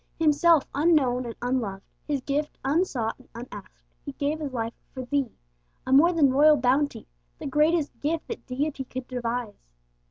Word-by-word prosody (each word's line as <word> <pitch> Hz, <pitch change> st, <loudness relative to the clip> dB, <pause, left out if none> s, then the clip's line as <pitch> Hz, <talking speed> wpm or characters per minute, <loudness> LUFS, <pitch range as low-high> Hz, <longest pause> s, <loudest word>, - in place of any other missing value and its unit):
Himself 320 Hz, 0 st, +4 dB
unknown 275 Hz, -6 st, +2 dB
and 230 Hz, -, -6 dB
unloved, 230 Hz, -6 st, -2 dB, 0.2 s
His 285 Hz, -3 st, -1 dB
gift 290 Hz, +3 st, -2 dB
unsought 270 Hz, -7 st, 0 dB
and 260 Hz, -, -20 dB
unasked, 220 Hz, -5 st, -10 dB, 0.2 s
He 280 Hz, -, -7 dB
gave 290 Hz, +3 st, -2 dB
His 295 Hz, -3 st, -4 dB
life 230 Hz, -2 st, -3 dB, 0.2 s
for 260 Hz, -, -4 dB
thee; 275 Hz, -2 st, -1 dB, 0.5 s
a 260 Hz, -, 0 dB
more 320 Hz, +6 st, +7 dB
than 295 Hz, -6 st, +3 dB
royal 300 Hz, +2 st, +6 dB
bounty 270 Hz, +3 st, +1 dB, 0.3 s
the -, -, -8 dB
greatest 300 Hz, +2 st, +1 dB
gift 320 Hz, +2 st, -2 dB
that -, -, -7 dB
Deity 275 Hz, +2 st, -2 dB
could 255 Hz, 0 st, -7 dB
devise. 240 Hz, -3 st, -4 dB
275 Hz, 160 wpm, -26 LUFS, 245-300 Hz, 0.5 s, more